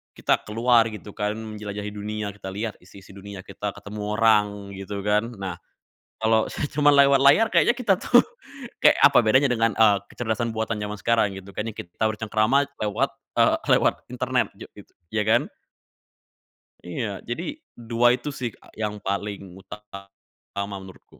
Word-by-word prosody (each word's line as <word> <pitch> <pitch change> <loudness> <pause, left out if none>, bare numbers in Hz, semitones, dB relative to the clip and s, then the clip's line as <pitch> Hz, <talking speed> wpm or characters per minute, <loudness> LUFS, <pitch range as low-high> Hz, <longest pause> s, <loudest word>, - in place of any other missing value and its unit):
kita - - 0
keluar 115 +1 +3
gitu 105 -1 -9
kan 105 +1 -2
menjelajahi 105 -2 -6
dunia, 105 0 -4
kita 100 -1 -11
lihat 105 +3 -5
isi-isi 95 +2 -16
dunia, 100 -1 -10
kita 100 +1 -6
ketemu 105 +1 -5
orang 105 -3 +2
gitu 100 0 -6
kan. 105 +2 +1
Nah, 95 -4 -6 0.6
kalau 110 0 +2 0.2
cuma 145 0 +4
lewat 140 -1 +5
layar 140 +11 +6
kayaknya 240 - +4
kita 225 -6 +2
tuh, 245 0 +5 0.6
kayak - - +6
apa 130 -5 +6
bedanya 130 +6 +4
dengan, 115 -2 +1
eee, 105 -3 +5 0.2
kecerdasan 115 0 -2
buatan 110 0 -2
zaman 105 -1 -5
sekarang 115 -3 +2
gitu 95 0 -11
kan 105 - -2
yang 115 - -4
kita 90 +2 -5
bercengkerama 110 +5 +1 0.2
lewat 115 +7 -1 0.2
eee, 115 -1 +3 0.2
lewat - - +3 0.2
internet - - -1
jok - - -10
gitu, - - -15 0.2
iya 105 -1 -1
kan? 115 +2 +2 1.4
Iya, 100 +3 -4
jadi 120 +9 -3 0.3
2 120 0 +1
itu 125 +4 -6
sih 120 -2 -2
Kak - - -21
yang 105 -1 -2
paling 100 -1 -4
utama 100 0 -9
menurutku. 95 -1 -15
105 Hz, 155 wpm, -24 LUFS, 100-115 Hz, 1.4 s, layar